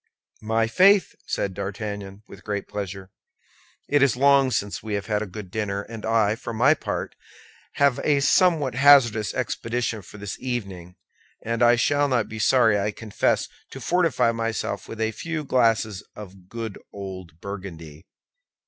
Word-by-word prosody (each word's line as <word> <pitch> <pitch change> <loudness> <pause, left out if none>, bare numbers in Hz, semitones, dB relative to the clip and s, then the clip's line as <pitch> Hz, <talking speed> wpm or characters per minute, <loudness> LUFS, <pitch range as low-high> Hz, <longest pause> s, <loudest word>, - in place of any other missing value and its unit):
"My 115 +1 +1
faith!" 190 - +4
said 100 - -2
D'Artagnan, 100 0 -6
with - - -13
great 100 -1 -3
pleasure. 95 -2 -6 0.8
"It 145 -1 +2
is 135 -4 +4
long 140 0 +4
since 105 -4 -2
we 110 -2 -3
have 100 - -3
had 105 -1 -1
a 110 - -3
good 95 -1 -9
dinner; 100 -2 -2
and 110 0 -7
I, 110 -2 +3
for 115 0 -6
my 130 +7 +5
part, 155 - -4 0.6
have 140 -3 +2
a 145 -2 +3
somewhat 150 -2 +3
hazardous 125 -5 +5
expedition 120 -2 -2
for 105 - -13
this 105 -1 -6
evening, 95 -9 -5 0.5
and 115 +1 -2 0.2
shall 145 +3 +2
not 125 -5 +1
be 110 - -7
sorry, 110 -2 +4
I 100 +1 0
confess, 105 0 -1 0.2
to - - -9
fortify 165 -9 +2
myself 115 -2 -3
with 115 - -8
a 110 0 0
few 160 +7 -4
glasses 115 -7 +1
of 95 -3 -12
good 115 -3 -6
old 95 -5 -8
Burgundy." 85 -6 -8
110 Hz, 155 wpm, -24 LUFS, 100-125 Hz, 0.8 s, my